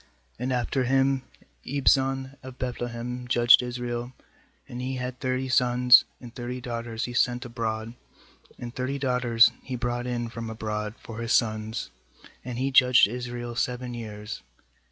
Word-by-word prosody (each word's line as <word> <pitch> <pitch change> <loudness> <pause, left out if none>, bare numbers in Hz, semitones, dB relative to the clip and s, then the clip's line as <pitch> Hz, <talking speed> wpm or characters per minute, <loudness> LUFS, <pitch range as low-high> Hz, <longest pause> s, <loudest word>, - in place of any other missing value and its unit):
8And 125 +2 -2
after 125 +1 0
him 135 +1 +2 0.4
Ibzan 135 -1 +1
of 130 0 -10
Beth 125 -1 -3
lehem 120 +1 -4
judge4 120 0 +6
Israel. 120 0 -4 0.5
9And 125 0 -6
he 130 +1 -3
had 125 0 -5
thirty 130 0 -1
sons, 125 0 +6
and 120 -2 -11
thirty 125 +1 -5
daughters 115 -2 -4
he 120 - -6
sent 125 -1 +1
abroad, 115 -1 -3 0.6
and 120 -1 -7
thirty 130 +2 -2
daughters 125 -3 +4
he 130 - -5
brought 120 0 -2
in 120 -1 -2
from 115 0 -6
abroad 105 -1 -4
for 115 -1 -9
his 115 0 -1
sons. 110 0 0 0.5
And 125 -1 -5
he 135 +2 0
judged 125 -3 +6
Israel 120 +1 -5
seven 125 0 -2
years. 105 -2 -7
125 Hz, 150 wpm, -26 LUFS, 115-125 Hz, 0.6 s, judge4